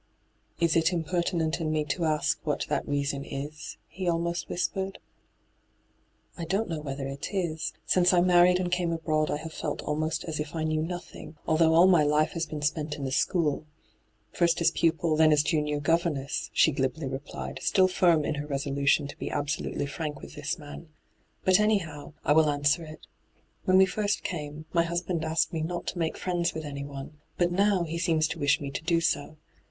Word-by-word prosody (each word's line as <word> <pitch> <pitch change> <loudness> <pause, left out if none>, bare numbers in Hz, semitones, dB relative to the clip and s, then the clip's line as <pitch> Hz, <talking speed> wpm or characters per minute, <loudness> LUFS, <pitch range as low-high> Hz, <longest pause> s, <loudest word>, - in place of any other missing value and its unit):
* - - -39
Is 170 -2 +2
it 165 +1 +3
impertinent 170 -1 -1
in 155 -1 -1
me 155 -1 0
to 165 +4 -1
ask 155 -1 +1
what - - -1
that - - -1
reason 140 -1 -1
is 145 +3 -6
V - - -22
he 185 -2 0
almost 170 +1 -1
whispered. 190 +2 -2 0.7
' - - -36
I - - -3
don't 195 +7 0
know 165 -3 -4
whether 135 -2 -4
it 135 +1 -5
is. 165 -4 -1
Since 180 -1 +4
I 180 - +4
married 180 0 +5
and 180 -1 -2
came 175 -1 +1
abroad 155 -2 0
I - - 0
have 160 +1 -8
felt 150 - -4
almost 155 +1 -1
as 160 -3 -4
if 150 +1 -4
I 160 - -1
knew 155 0 0
nothing, 175 -1 -7
although 160 0 +3
all 170 +2 +7
my 180 -4 +6
life 150 +1 +2
has 165 -1 -3
been 150 -1 -6
spent 150 0 -1
in 140 -2 -5
a 130 - -3
school 155 +1 +1 0.3
— 105 0 -42
first 170 -1 +2
as 170 - +3
pupil, 165 -1 +1
then 155 0 +5
as 150 -1 +4
Junior 150 -1 0
governess,' 150 -2 0
she 160 - +4
glibly 135 +3 -2
replied, 135 +2 -6
still 185 -1 +4
firm 170 -4 +3
in - - 0
her 145 - -7
resolution 140 +1 +1
to 145 - -8
be - - -4
absolutely 145 0 -2
irank 150 +1 -5
with - - -11
this 145 +2 -3
man. 150 +1 -10 0.3
' - - -41
But, 185 +1 +5
anyhow, 170 -10 0
I 150 - +4
will 155 0 +5
answer 145 +3 +1
it. 155 -1 -11 0.6
When 185 0 +5
we 190 - +7
first 205 +2 -1
came, 150 -2 -5
my 170 - +4
husband 170 0 -2
asked 160 +3 0
me 160 - -1
not 175 +2 -3
to 180 - -6
make 160 -1 -1
friends 175 -1 -1
with 160 -1 -4
anyone; 140 +1 -7 0.2
but 175 0 +2
now 195 0 +3
he 170 0 -4
seems 165 -3 +2
to - - -5
wish 145 0 +3
me 140 -1 -5
to - - -4
do 165 0 +2
so. 155 -2 -1
160 Hz, 205 wpm, -28 LUFS, 150-175 Hz, 0.7 s, all